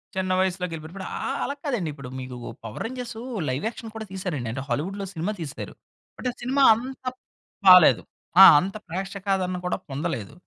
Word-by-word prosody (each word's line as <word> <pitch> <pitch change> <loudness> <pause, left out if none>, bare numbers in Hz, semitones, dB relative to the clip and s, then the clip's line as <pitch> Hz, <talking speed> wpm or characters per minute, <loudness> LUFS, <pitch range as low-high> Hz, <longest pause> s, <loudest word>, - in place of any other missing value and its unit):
చిన్న 185 0 -1
వయస్సులోగెలిపోయారిప్పుడు. 180 -1 -3
ఆహ్, 275 - -2
అలా 280 - -2
కాదండిప్పుడు, 160 - -3
మీకు 130 -1 -7 0.3
పవర్ 110 - -5
రేంజర్సు, 245 -2 -6 0.3
లైవ్ 130 +7 -2
యాక్షన్ 225 -2 -10
కూడా 220 0 -5
తీసారండి. 170 - -3
అంటే, 130 +3 -4
హాలీవుడ్‌లో 190 +11 -2
సినిమా 170 +4 -2
తీశారు. 150 -4 -6 0.5
అంటే 250 - -1
సినిమా 265 +3 +2
అంత 260 +3 -7 0.6
బాలేదు. 180 -9 +9 0.4
ఆ! - - +13 0.2
అంత 190 +5 -4
ప్రేక్షకాదరణ 190 +1 -2
కూడా 180 - 0
పొందలేదు. 140 -5 -3
185 Hz, 145 wpm, -25 LUFS, 155-215 Hz, 0.6 s, ఆ